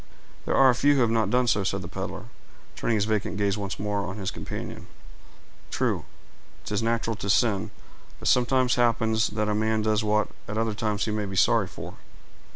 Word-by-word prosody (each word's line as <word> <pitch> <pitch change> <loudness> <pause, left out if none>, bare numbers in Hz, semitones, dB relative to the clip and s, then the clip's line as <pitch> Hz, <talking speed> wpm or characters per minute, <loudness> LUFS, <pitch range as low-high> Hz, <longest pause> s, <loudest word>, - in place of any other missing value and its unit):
"There - - +1
are 130 -2 +6
few 145 +4 +3
who 135 - +3
have 115 -2 +3
not 110 -3 +1
done 125 +3 +2
so," 105 -4 +2
said 95 0 -2
the - - -6
peddler, 85 - -5 0.5
turning 115 - 0
his 105 -1 +1
vacant 105 -2 -1
gaze 100 -1 +1
once 100 -2 -4
more 105 0 -1
on 100 0 -5
his 95 -2 -3
companion. - - -7 0.8
"True—'tis 105 0 -4
natural 115 0 0
to 100 - -4
sin; 105 -2 +2 0.5
but - - -4
it - - +6
sometimes 125 0 +3
happens 110 -2 +2
that 105 0 -2
a 105 - +1
man 110 +1 +1
does 110 0 +1
what 105 0 +1 0.2
at 105 - -4
other 115 -1 0
times 105 -1 -1
he 110 - -2
may 105 -1 -1
be 95 -1 -6
sorry - - +3
for. - - -9
110 Hz, 195 wpm, -26 LUFS, 105-115 Hz, 0.8 s, are